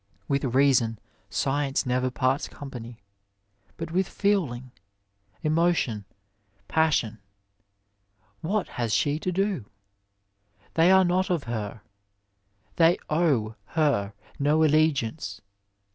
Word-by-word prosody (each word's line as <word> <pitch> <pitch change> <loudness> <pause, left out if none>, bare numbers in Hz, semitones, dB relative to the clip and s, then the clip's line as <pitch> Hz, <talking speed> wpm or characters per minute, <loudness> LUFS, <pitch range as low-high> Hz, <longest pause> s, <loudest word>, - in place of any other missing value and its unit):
With 140 -1 0
reason 130 -3 +3 0.3
science 140 0 0
never 125 0 +1
parts 130 +2 0
company, 120 -4 -9 0.8
but 165 0 -5
with 185 +2 +1
feeling, 140 -12 0 0.7
emotion, 155 - +1 0.6
passion, 150 -9 +1 1.2
what 200 +4 -1
has 115 -3 -1
she 145 +9 +1
to 185 - -2
do? 195 - -1 1.1
They 165 +2 +4
are 190 0 +6
not 185 +2 +1
of 170 -5 0
her; 110 -2 -5 1.0
they 170 +1 +5
owe 145 -10 +2 0.2
her 140 -11 +1 0.3
no 150 +3 +3
allegiance. 150 -8 +1
145 Hz, 100 wpm, -26 LUFS, 120-165 Hz, 1.2 s, are